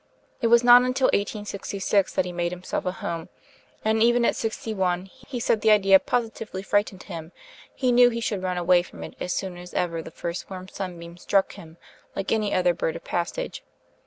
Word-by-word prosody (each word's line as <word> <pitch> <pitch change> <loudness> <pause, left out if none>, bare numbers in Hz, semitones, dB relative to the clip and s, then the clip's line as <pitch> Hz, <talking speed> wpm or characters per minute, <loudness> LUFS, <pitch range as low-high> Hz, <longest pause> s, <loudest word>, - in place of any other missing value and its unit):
It 235 - +3
was 235 +1 +5
not 245 0 +9
until 255 +1 +2
1866 200 -1 -1
that - - +2
he 180 - -4
made 175 0 -2
himself 180 +1 -4
a - - +1
home; 170 -2 -5 0.6
and 220 0 +2
even 240 +1 +4
at - - +2
sixty 225 0 -3
one 180 -2 0
he 245 +4 -8
said 225 -2 +1
the 220 - +3
idea 195 -2 +6
'positively 225 -5 -3
frightened 205 -2 0
him 165 0 -8 0.4
he 255 -2 +1
knew 245 0 +7
he 235 -1 -3
should 210 -4 -2
run 185 -1 -2
away 175 0 +4
from 175 - -11
it - - -9
as 180 - -3
soon 185 -1 -3
as 180 0 -11
ever 165 -2 -1
the 160 - -9
first 170 +2 -5
warm 185 -1 -7
sunbeam 175 -3 -7
struck 195 +2 +1
him, 160 0 -13 0.4
like 195 - -3
any 215 -2 +1
other 180 -1 +3
bird 160 - -2
of 170 - -8
passage.' 180 - -3
195 Hz, 200 wpm, -25 LUFS, 175-225 Hz, 0.6 s, not